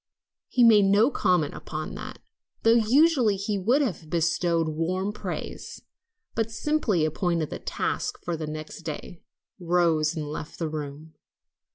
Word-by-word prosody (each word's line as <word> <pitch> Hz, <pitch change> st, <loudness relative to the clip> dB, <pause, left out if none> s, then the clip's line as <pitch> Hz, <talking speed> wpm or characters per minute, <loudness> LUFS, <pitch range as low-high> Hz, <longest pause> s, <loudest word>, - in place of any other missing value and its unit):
He 245 Hz, -, +2 dB
made 215 Hz, -4 st, +7 dB
no 205 Hz, +7 st, +4 dB
comment 175 Hz, -, +1 dB
upon 155 Hz, 0 st, -6 dB
that, -, -, -7 dB, 0.5 s
though 225 Hz, -, +6 dB, 0.2 s
usually 270 Hz, -6 st, +4 dB
he 200 Hz, +1 st, -2 dB
would 245 Hz, +10 st, +3 dB
have 175 Hz, -, -4 dB
bestowed 170 Hz, 0 st, +1 dB
warm 185 Hz, +6 st, -1 dB
praise, 210 Hz, -, -6 dB, 0.5 s
but 225 Hz, 0 st, -1 dB
simply 225 Hz, -, 0 dB
appointed 165 Hz, 0 st, -1 dB
the -, -, -5 dB
tasks -, -, -3 dB
for 170 Hz, -, -2 dB
the 155 Hz, -1 st, -5 dB
next 155 Hz, +1 st, -7 dB
day, 165 Hz, +1 st, -7 dB, 0.4 s
rose 170 Hz, -3 st, +2 dB
and 155 Hz, -2 st, -3 dB
left 150 Hz, +1 st, -7 dB
the 165 Hz, -, -2 dB
room. 150 Hz, +1 st, -7 dB
175 Hz, 145 wpm, -26 LUFS, 155-210 Hz, 0.5 s, made